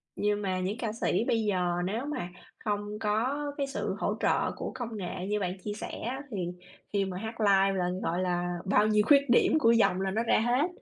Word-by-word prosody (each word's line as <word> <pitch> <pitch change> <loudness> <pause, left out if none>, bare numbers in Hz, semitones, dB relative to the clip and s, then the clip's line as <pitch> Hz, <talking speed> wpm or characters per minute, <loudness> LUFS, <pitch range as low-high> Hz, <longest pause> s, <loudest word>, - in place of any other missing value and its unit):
Nhưng 210 0 0
mà 190 -2 -1
những 190 +4 -2
ca 230 -3 -2
sĩ 230 - +1
bây 225 -1 +2
giờ 180 -4 +1
nếu 220 +8 -2
mà 285 -12 -3 0.3
không 205 0 -3
có 225 +6 0 0.2
cái 280 -1 -1
sự 275 - -3
hỗ - - 0
trợ - - +1
của - - -5
công 235 -4 -5
nghệ 180 -1 -4
như 210 +1 0
bạn 185 -1 -2
chia 210 - -3
sẻ 210 - -6
á, 255 +4 -3
thì 185 -5 -2 0.5
khi 200 -1 +2
mà 185 -1 -5
hát 220 +4 -5
live 195 -1 +4
là, 180 0 +1
gọi 175 +2 0
là, 175 -1 0 0.2
bao 205 +2 +3
nhiêu 210 -1 +4
khuyết 280 -1 +6
điểm 245 +6 +4
của 230 -6 +5
giọng 220 -5 +3
là 190 0 0
nó 220 +4 0
ra 235 - +3
hết. 245 +7 +2
210 Hz, 225 wpm, -29 LUFS, 190-230 Hz, 0.5 s, khuyết